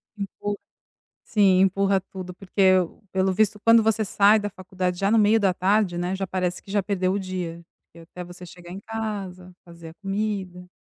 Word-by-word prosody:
Empurra, 205 0 -4 0.7
sim, 195 -4 +3
empurra 195 +1 +2
tudo, 185 -1 -9
porque 190 0 +2 0.4
pelo 190 0 +1
visto 210 +2 +1
quando 230 0 +6
você 220 0 +1
sai 205 +2 +4
da 205 0 -3
faculdade 185 -1 -4
já 195 0 +1
no 225 - +4
meio 215 +1 +5
da 195 -2 +3
tarde, 190 -1 +1
né, 180 +2 -2
já 195 0 -3
parece 180 -1 -2
que - - -14
já 205 0 +1
perdeu 185 -1 0
o 200 - 0
dia, 180 -3 -5 0.2
porque 170 - -19
até 180 - -7
você 175 +1 -11
chegar 175 0 -13
em 195 - -7
casa, 200 -5 -6
fazer 170 -1 -12
a 160 - -12
comida. 195 -2 -4
190 Hz, 190 wpm, -24 LUFS, 180-205 Hz, 0.7 s, quando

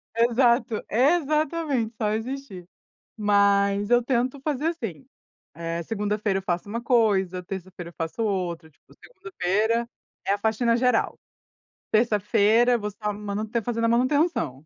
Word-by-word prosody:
Exato. 235 0 +2
É, 265 +9 +4
exatamente, 300 -6 -1
só 215 -2 -1
existir. 225 -6 -5 0.5
Mas 200 0 +2
eu 240 0 +5
tento 255 +2 -1
fazer 295 +2 -1
assim, 225 - -5 0.5
eh, 165 +1 -4
segunda-feira 205 0 -1
eu - - -6
faço 180 +1 -2
uma 230 +3 -3
coisa, 200 -7 +2
terça-feira 180 -2 -8
eu - - -23
faço 165 +8 -3
outra, 175 -6 -2
tipo, 145 - -25
segunda-feira 230 - -2 0.4
é - - +2
a 205 - 0
faxina 225 +2 +1
geral, 250 -1 +1 0.7
terça-feira 220 +2 +3
você 210 -2 -5
tá 210 -1 -2
manu 205 +1 -4
tá 230 +1 -1
fazendo 230 0 -2
a 230 - +3
manutenção. 255 - +1
220 Hz, 140 wpm, -25 LUFS, 200-245 Hz, 0.7 s, eu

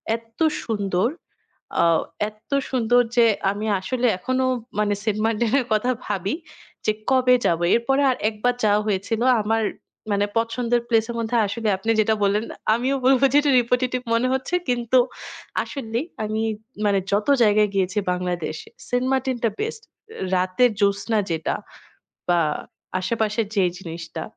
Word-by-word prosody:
এত্তো 230 +5 -5 0.2
সুন্দর, 200 -2 0 0.7
আ - - +4 0.5
এত্তো 215 +6 -6 0.2
সুন্দর 245 -1 +3 0.2
যে, 235 - +7 0.3
আমি 205 +2 -4 0.2
আসলে 250 +5 0
এখনও 255 +4 0 0.3
মানে 210 -1 +2
সেন্ট 215 -1 -1
মার্টিনের 230 +4 +1
কথা 215 +4 +1 0.2
ভাবি 200 - -1 0.5
যে, 215 - +4 0.2
"কবে 255 -1 +5
যাব?" 165 -1 +2 0.2
এরপরে 270 +4 +1
আর 255 - -2
১ 220 - -11
বার 245 0 +3
যাওয়া 210 0 +3
হয়েছিল। 210 +3 -1 0.2
আমার, 225 +1 0 0.5
মানে 200 0 +2
পছন্দের 235 +1 0
প্লেস 225 -2 +3
এর - - -6
মধ্যে 230 +1 0
আসলে 220 +2 -3
আপনি 225 +4 -5
যেটা 220 +1 +2
বললেন, 205 +3 +2 0.3
আমিও 255 +4 0
বলব, 265 -1 +5
যেটা 290 0 +4
রিপিটেটিভ 250 +1 0
মনে 240 +2 +2
হচ্ছে। 265 +7 -1
কিন্তু 245 +1 +2 0.6
আসলেই 255 -1 -4 0.2
আমি, 215 +1 -2 0.4
মানে 200 -1 +3
যত 205 +4 +1 0.2
জায়গায় 210 -1 +4
গিয়েছি 190 +1 0
বাংলাদেশে, 175 -3 -3 0.2
সেন্ট 245 +1 0
মার্টিনটা 255 -3 0
বেস্ট। 445 0 -3 0.5
রাতের 185 +7 +3
জোছনা 200 +2 +2
যেটা 160 -1 -1 0.7
বা 175 -1 +4 0.6
আশেপাশের 215 +2 -1
যে 195 - +3 0.2
জিনিসটা। 165 -2 -7
225 Hz, 140 wpm, -23 LUFS, 205-245 Hz, 0.7 s, যে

